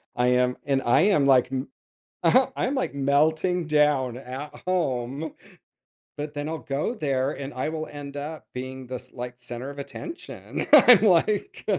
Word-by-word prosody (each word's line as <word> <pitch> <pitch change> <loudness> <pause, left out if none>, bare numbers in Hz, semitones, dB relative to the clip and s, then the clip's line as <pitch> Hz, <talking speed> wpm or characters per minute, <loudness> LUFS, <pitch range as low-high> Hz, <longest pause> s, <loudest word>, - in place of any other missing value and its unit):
I 125 0 +2
am 125 0 +2
and 135 -1 +1
I 120 - +4
am, 190 -6 +3
like, 130 -2 +4
m 130 +1 -3 0.5
aha, 260 0 +4
I'm, 265 - 0
like, 260 - -2
melting 155 +5 +1
down 145 -5 +2
at 135 +3 -8
home, 145 -4 -2 0.8
but 150 0 -5
then 145 0 -3
I'll 160 0 -4
go 145 - -2
there, 140 - -1
and 140 -1 -7
I 130 +4 -2
will 155 0 -4
end 145 -1 -8
up 150 +1 -7
being 130 +1 -6
this, 125 0 -8
like, 125 0 -7
center 125 +2 -7
of 145 - -10
attention. 335 - -7
I'm 250 -7 +9
like 205 0 +2
140 Hz, 165 wpm, -25 LUFS, 130-160 Hz, 0.8 s, I'm